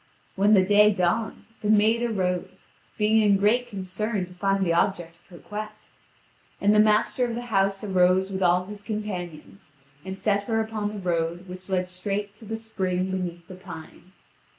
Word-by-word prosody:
When 205 +2 +4
the 190 -1 +4
day 210 +2 +6
dawned, 200 +4 -1 0.2
the 210 - -1
maid 215 +2 +4
arose, 185 -5 -2 0.3
being 220 +1 +3
in 205 -2 +4
great 225 +5 +2
concern 200 +1 -3
to 180 - -15
find 195 +1 0
the 170 - +1
object 170 -2 0
of 170 - -31
her 175 - -13
quest. 215 +3 -9 0.6
And 205 +1 +3
the 210 - +5
master 215 +4 +3
of 235 -2 -1
the 240 - -4
house 195 +1 +1
arose 190 -1 +2
with 190 0 -3
all 180 0 +3
his 205 +1 -9
companions, 180 - -6 0.3
and 190 +1 -6
set 200 0 0
her 225 0 0
upon 220 -2 -2
the 210 - -7
road 175 -1 -2
which 185 +1 -9
led 185 -1 0
straight 200 +3 -4
to 220 - -11
the 220 +1 -4
spring 190 -4 -2
beneath 175 -2 -4
the - - -10
pine. 180 -1 -11
195 Hz, 180 wpm, -25 LUFS, 180-210 Hz, 0.6 s, day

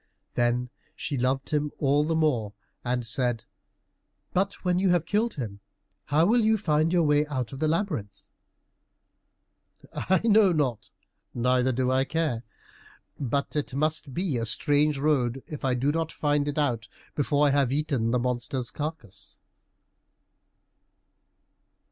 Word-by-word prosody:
Then 120 +1 0 0.2
she 150 - -4
loved 130 +3 -1
him 150 -1 0
all 145 +1 +2
the 160 +2 0
more 125 -10 +1 0.3
and 125 -1 -1
said, 120 0 -1 0.9
"But 195 +2 +1
when 180 0 +2
you 190 0 +2
have 175 -2 +2
killed 220 +3 0
him, 110 -8 -5 0.5
how 150 +3 +3
will 235 +4 +4
you 220 0 +3
find 160 -4 +1
your 175 -2 +3
way 150 0 +3
out 130 -5 -3
of 135 - -7
the 155 - +1
labyrinth?" 155 - -2 1.7
"I 190 0 +1
know 215 -3 +5
not, 135 -8 -1 0.5
neither 125 +1 +2
do 130 +1 0
I 130 +1 +2
care, 155 -7 -1 0.8
but 140 +2 -2
it 145 -3 -2
must 155 0 -1
be 165 -1 -1
a 115 -1 -2
strange 145 +5 +2
road 135 -3 +1
if 150 - -8
I 130 -2 +1
do 135 +4 +1
not 165 +1 -2
find 145 -1 0
it 145 - -3
out 125 -6 0 0.3
before 145 0 +2
I 145 - +4
have 140 -3 +2
eaten 140 -5 0
up - - +1
the 125 - +2
monster's 125 0 -1
carcass." 150 - -7
145 Hz, 150 wpm, -27 LUFS, 125-155 Hz, 1.7 s, know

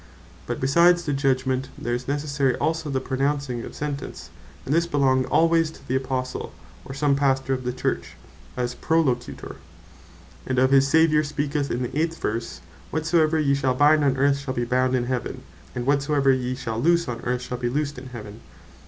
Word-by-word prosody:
But - - -3
besides 170 +6 +4
the 145 - -1
Judgment, 130 -1 0
there 120 - -3
is 120 +1 -3
necessary 140 -2 0
also 160 -1 -1
the 135 -1 0
pronouncing 135 -1 -1
of - - -9
Sentence: 145 -2 -5 0.3
And 140 - -1
this 170 +1 +2
belonged 130 -4 +2
alwaies 165 +3 +3
to - - -16
the 130 - -1
Apostle, 130 -1 -3 0.3
or 135 - -8
some 140 0 +2
Pastor 135 -1 +1
of 130 -1 -4
the 125 - 0
Church, 125 - -3 0.4
as 125 0 -1
Prolocutor; 135 -4 -1 0.9
and 130 - -1
of 130 +1 +4
this 135 0 +6
our 160 +3 +4
Saviour 155 -2 +3
speaketh 145 -1 -2
in 125 +2 -1
the 125 - -5
18 165 +2 0
verse, 115 +2 -3 0.3
"Whatsoever 160 0 +2
ye 140 -2 +2
shall 135 -2 +1
bind 150 +2 +5
on 135 -2 +2
earth, 140 +1 +3
shall 135 -2 -5
be 120 - -1
bound 130 +1 +1
in 120 -1 0
heaven; 125 -1 -3 0.3
and 120 - -3
whatsoever 140 0 +2
ye 130 -1 -1
shall 115 -4 -4
loose 170 +2 +3
on 120 -1 -4
earth, 125 0 -2
shall 125 0 -5
be 120 -1 -1
loosed 145 0 -2
in 130 - -10
heaven." 110 -4 -9
135 Hz, 190 wpm, -24 LUFS, 130-150 Hz, 0.9 s, this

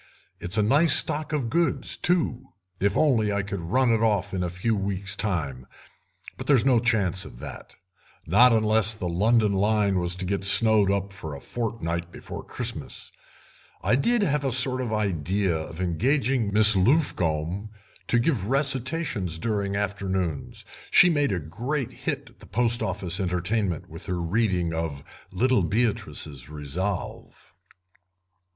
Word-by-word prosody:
It's 90 +4 -2
a 105 - +3
nice 145 +7 +4
stock 155 +1 +2
of 145 -6 -1
goods, 165 +7 0
too, 175 -8 0 0.3
if 100 0 +1
I 110 -9 +2
could 100 -1 -5
only 85 0 -8
run 130 0 +3
it 115 -1 +1
off 100 -3 0
in 95 - -2
a 90 - -1
few 95 +6 -1
weeks 100 -1 -2
time, 70 - -3 0.7
but - - -8
there's 135 -5 +4
no 130 -3 +4
chance 105 -6 0
of - - -12
that—not 95 - -1
unless 110 -1 +3
the 95 -4 -4
London 105 +4 +2
line 100 -1 +1
was 90 0 -1
to 95 0 -4
get 100 +1 -2
snowed 105 0 +6
up 100 0 -1
for 80 -6 -7
a - - -8
fortnight 85 -8 -4
before - - -8
Christmas. - - -5 0.7
I - - +3
did 235 - +1
have 150 -5 0
a 135 - 0
sort 130 +1 +2
of 120 -3 -3
idea 95 -3 -1
of 80 +1 -6
engaging 120 - 0
Miss 105 +1 +8
Luffcombe 95 - 0 0.4
to 120 - +3
give 120 - 0
recitations 135 - -1
during 100 0 -2
afternoons; 95 -6 -3 0.2
she 180 - +6
made 145 -6 +1
a 90 - -1
great 120 - -4
hit - - -5
at - - -27
the - - -15
Post 120 0 0
Office 90 0 -2
entertainment 90 0 -2
with 80 +5 -12
her 90 -2 -2
rendering 90 -1 0
of 80 -4 -6
'Little 125 -2 +2
Beatrice's 85 - -2
Resolve'." 75 +6 -5
100 Hz, 150 wpm, -25 LUFS, 90-120 Hz, 0.7 s, Miss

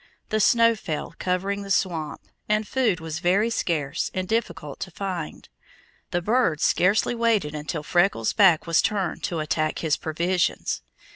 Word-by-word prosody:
The 215 - +1
snow 230 +2 +5
fell, 165 -7 -5
covering 195 +2 -1
the 200 - -8
swamp, 170 -5 -1 0.3
and 215 0 +1
food 235 -9 +1
was 160 -1 -5
very 195 +7 +2
scarce 155 -8 -1
and 185 0 -2
difficult 215 -10 -3
to 185 - -5
find. 185 -3 -5 0.6
The 175 0 -1
birds 215 -8 +1
scarcely 195 +6 +3
waited 230 -10 +1
until 150 +1 -4
Freckles' 175 - +2
back 185 -6 +5
was 165 -1 +3
turned 195 -5 -1
to 175 -4 -3
attack 155 0 -1
his 155 -3 0
provisions. 170 +3 -1
180 Hz, 150 wpm, -24 LUFS, 160-205 Hz, 0.6 s, snow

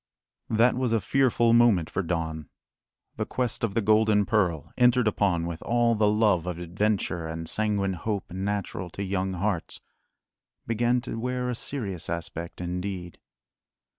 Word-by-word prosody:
That 115 +3 +4
was 125 -2 0
a 115 - +3
fearful 120 -1 +2
moment 115 -9 +5
for 95 - -2
Don. 80 -4 -3 0.7
The - - -1
quest 125 -3 -2
of 105 -3 -1
the 115 - +2
golden 110 -1 +4
pearl, 90 -8 0
entered 125 -1 +4
upon 95 -5 +1
with 85 -1 -5
all 120 0 +2
the 105 -1 +2
love 105 -5 +2
of 90 -2 -3
adventure 90 -1 -1
and 80 0 -5
sanguine 100 -1 0
hope 100 +1 -4
natural 95 -1 -3
to 100 - -2
young 95 -1 -1
hearts, 95 -1 -2 0.9
began 120 +2 +1
to 115 - -5
wear 125 +1 -2
a - - -3
serious 100 - -3
aspect 85 0 -5
indeed. 90 0 -4
100 Hz, 150 wpm, -27 LUFS, 90-115 Hz, 0.9 s, moment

